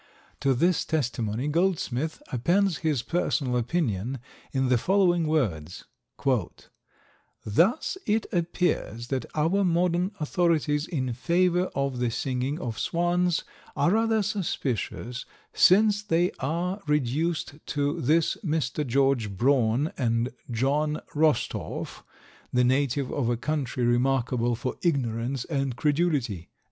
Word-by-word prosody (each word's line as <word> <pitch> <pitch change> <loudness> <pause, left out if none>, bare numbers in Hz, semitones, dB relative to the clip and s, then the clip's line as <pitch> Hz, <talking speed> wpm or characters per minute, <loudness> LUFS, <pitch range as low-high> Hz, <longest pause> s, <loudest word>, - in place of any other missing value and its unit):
To 135 -2 +2
this 170 +7 +2
testimony 120 -4 -1
Goldsmith 160 -3 -1
appends 175 +9 +2
his 150 -7 0
personal 140 -6 0
opinion 125 - -1 0.3
in 130 -1 0
the 125 -2 +3
following 175 - +2
words: 90 - -1 1.6
"Thus 190 - +2
it 215 +1 +1
appears 170 - -1
that 135 -2 -2
our 165 +6 +2
modern 180 +2 +1
authorities 155 -2 +1
in 130 -7 -2
favour 180 +7 +2
of 140 -2 -1
the 125 -1 +1
singing 130 +5 -2
of 115 -7 -4
swans 175 0 +1 0.3
are 170 - +2
rather 225 0 +2
suspicious, 135 - -3 0.3
since 205 +2 +5
they 175 -3 +1
are 175 +8 -2
reduced 150 +2 -1
to 145 +3 -1
this 155 +5 +2
Mr. 150 -4 -1
George 135 -3 +2
Braun 130 - +2
and 115 -1 +1 0.2
John 145 +6 0
Rostorph, 150 -4 -1 0.5
the 125 0 +3
native 130 +1 +1
of 125 -5 0
a 120 - +1
country 130 -2 -2
remarkable 120 -1 +1
for 125 +3 -4
ignorance 125 -5 -1
and 135 -5 -2
credulity." 145 - 0
145 Hz, 115 wpm, -26 LUFS, 125-170 Hz, 1.6 s, since